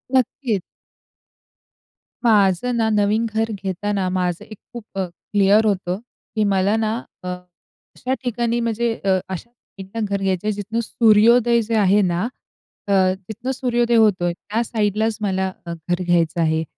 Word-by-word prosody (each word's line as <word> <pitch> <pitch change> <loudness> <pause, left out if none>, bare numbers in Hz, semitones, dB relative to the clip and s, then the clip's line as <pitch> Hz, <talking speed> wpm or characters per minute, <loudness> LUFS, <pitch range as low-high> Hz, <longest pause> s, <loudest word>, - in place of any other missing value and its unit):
नक्कीच. 245 -4 +1 1.6
माझं 210 +1 +3
ना, 225 -1 +2
नवीन 210 +2 +2
घर 225 0 -1
घेताना 195 0 -2
माझं 180 -2 -2
एक 215 - -11 0.2
खूप 235 -3 -8
अ, 190 - 0
क्लिअर 200 +4 +2
होतं 185 -2 0 0.4
की 215 - +2
मला 195 +3 +2
ना 220 0 0 0.3
अ, - - -6 0.7
अशा 255 - -2
ठिकाणी 240 0 0
म्हणजे 230 0 0
अ, 190 -1 +3
अशा 190 +6 -7 0.3
ठिकाणी 195 +3 -4
घर 200 -1 -2
घ्यायचं 190 +1 -1
आहे, 215 - +2
जिथनं 205 +3 -3
सूर्योदय 235 +2 +4
जे 225 +1 -2
आहे 205 0 +4
ना 175 -1 0 0.7
अ, - - -1 0.4
तिथनं 235 +4 -4
सूर्योदय 240 -2 +1
होतोय, 185 -6 +3
त्या 215 +6 -3
साईडलाच 215 -1 0
मला 190 -2 0 0.2
घर 175 +2 -3
घ्यायचं 170 -2 +1
आहे. 160 0 +1
210 Hz, 145 wpm, -21 LUFS, 190-230 Hz, 1.6 s, सूर्योदय